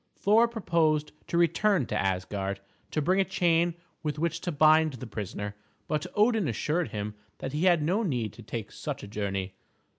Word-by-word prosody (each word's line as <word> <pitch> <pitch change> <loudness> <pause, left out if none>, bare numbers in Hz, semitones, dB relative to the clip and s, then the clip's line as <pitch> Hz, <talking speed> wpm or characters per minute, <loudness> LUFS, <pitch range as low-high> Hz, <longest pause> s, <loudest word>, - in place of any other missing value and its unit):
Thor 220 +4 +4
proposed 165 -9 +1 0.2
to 170 - -1
return 175 - +3
to - - -4
Asgard, 95 +1 -1 0.3
to 155 - -1
bring 185 +5 +3
a - - +5
chain 175 -2 +2 0.3
with 150 -2 -2
which 170 +1 -1
to 175 - -2
bind 155 0 +5
the 125 0 -7
prisoner; 105 -1 -5 0.3
but 155 -1 -1
Odin 215 -3 +3
assured 150 +8 0
him 105 -1 -4 0.2
that 135 - -5
he 155 +5 +1
had 175 -4 +4
no 185 +8 +1
need 125 - -1
to - - -12
take - - -6
such - - -5
a - - -7
journey. 100 -2 -3
155 Hz, 180 wpm, -28 LUFS, 105-175 Hz, 0.3 s, a